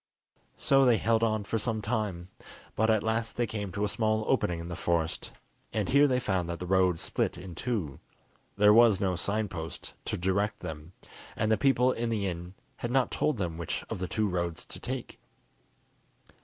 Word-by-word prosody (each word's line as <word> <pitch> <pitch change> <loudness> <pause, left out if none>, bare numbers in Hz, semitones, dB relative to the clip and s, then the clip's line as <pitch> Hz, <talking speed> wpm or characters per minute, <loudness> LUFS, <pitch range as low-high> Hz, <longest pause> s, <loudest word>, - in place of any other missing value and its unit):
So 135 0 +4
they 120 -3 +5
held 115 +1 +2
on 110 -2 +1
for 110 +2 -2
some 110 0 -1
time, 105 -5 -2 0.5
but 110 +1 +2
at 110 -2 +3
last 115 +1 -1
they 120 - +2
came 105 -3 -4
to 100 - -2
a - - +2
small 110 +1 0
opening 90 -10 +1
in 85 - -6
the 85 - -5
forest, 85 -2 -1 0.4
and 105 -4 -1
here 145 +1 +6
they 125 -2 +2
found 95 -7 -1
that 85 - -3
the 90 - -6
road 90 -2 +3
split - - -1
in 90 -2 -8
two. 90 - -3 0.6
There 105 +1 +7
was 115 -3 +6
no 95 -3 +1
sign 105 +5 0
post 80 -3 -7
to - - -2
direct 100 +4 0
them, 80 +2 -7 0.4
and 110 - 0
the - - +6
people 130 0 +3
in 120 -1 -2
the 105 -3 -1
inn 90 0 -5 0.2
had 120 - -3
not 130 0 +2
told 150 -5 0
them 85 -4 -3
which 85 - -3
of - - -3
the 95 - -2
two 105 +6 0
roads 85 -3 -2
to - - -9
take. - - -5
105 Hz, 195 wpm, -29 LUFS, 90-115 Hz, 0.6 s, There